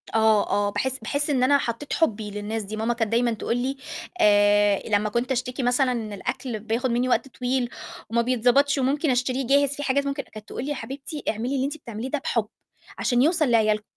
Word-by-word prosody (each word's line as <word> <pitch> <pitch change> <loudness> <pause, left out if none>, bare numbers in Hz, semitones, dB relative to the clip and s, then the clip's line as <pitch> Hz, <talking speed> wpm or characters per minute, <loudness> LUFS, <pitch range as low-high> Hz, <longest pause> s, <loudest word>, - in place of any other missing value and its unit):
آه 220 -2 +4
آه، 205 0 +2
باحس 260 +4 -2
باحس 290 +2 -1
إن 260 -3 +2
أنا 285 +2 +5
حطّيت 255 +2 -4
حُبّي 220 -9 0
للناس 210 +2 -4
دي، 205 +2 -6
ماما 225 +2 0
كانت 225 -2 -2
دايمًا 235 0 +2
تقول 230 +2 -2
لي 265 +3 -2 0.4
آآ 205 -1 +4
لمّا 210 0 +2
كنت 240 +4 -1
أشتكي 255 0 -2
مثلًا 250 +1 +2
إن 225 -4 -3
الأكل 220 +4 -4
بياخُد 230 +4 -1
منّي 245 +2 +1
وقت 255 - +1
طويل 250 -1 -1 0.4
وما 235 +1 +2
بيتضبطش 255 +4 +3
وممكن 280 +4 +1
أشتريه 255 +1 0
جاهز، 280 +1 +3
في 290 - -5
حاجات 280 +1 +1
ممكن 280 0 -2
أ - - -23
كانت 215 -1 -11
تقول - - -5
لي - - -4
"يا - - -1
حبيبتي 280 +3 -7
اعملي 235 +5 -2
اللي 265 0 0
أنتِ 290 +3 -4
بتعمليه 235 -3 -6
ده 295 - -1
بحُب 230 -5 -1 0.5
عشان 245 -1 +2
يوصل 315 0 +3
لعيالِكم" 215 -2 +3
245 Hz, 210 wpm, -24 LUFS, 220-270 Hz, 0.5 s, أنا